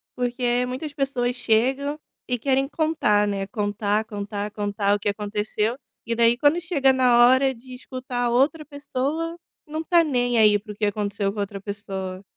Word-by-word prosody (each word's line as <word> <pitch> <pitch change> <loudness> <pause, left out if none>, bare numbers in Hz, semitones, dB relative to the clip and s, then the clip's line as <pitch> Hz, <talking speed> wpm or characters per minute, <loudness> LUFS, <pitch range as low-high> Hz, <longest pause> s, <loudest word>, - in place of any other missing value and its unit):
Porque 245 0 0
muitas 280 +4 -5
pessoas 255 -3 -1
chegam 265 +6 +1 0.3
e 250 -1 0
querem 270 +2 +1
contar, 295 -10 +1
né, 195 -1 -2
contar, 210 0 -1
contar, 205 0 -5
contar 205 -1 0
o 205 - -4
que 205 - -1
aconteceu, 210 +3 -2 0.3
e 230 - -1
daí 235 +1 +4
quando 300 +5 +3
chega 280 -6 +2
na 245 -2 +5
hora 265 +1 +4
de 255 +1 -13
escutar 250 -1 -4
a 240 - +1
outra 280 +6 +2
pessoa, 295 +3 -3 0.3
não 310 +2 -4
tá 340 0 +4
nem 245 -5 +1
aí 210 -1 +6
para 210 +1 -10
o - - -17
que 210 +1 -1
aconteceu 200 -1 -1
com 210 - -7
outra 200 0 -3
pessoa. 195 -2 -6
240 Hz, 175 wpm, -24 LUFS, 205-270 Hz, 0.3 s, aí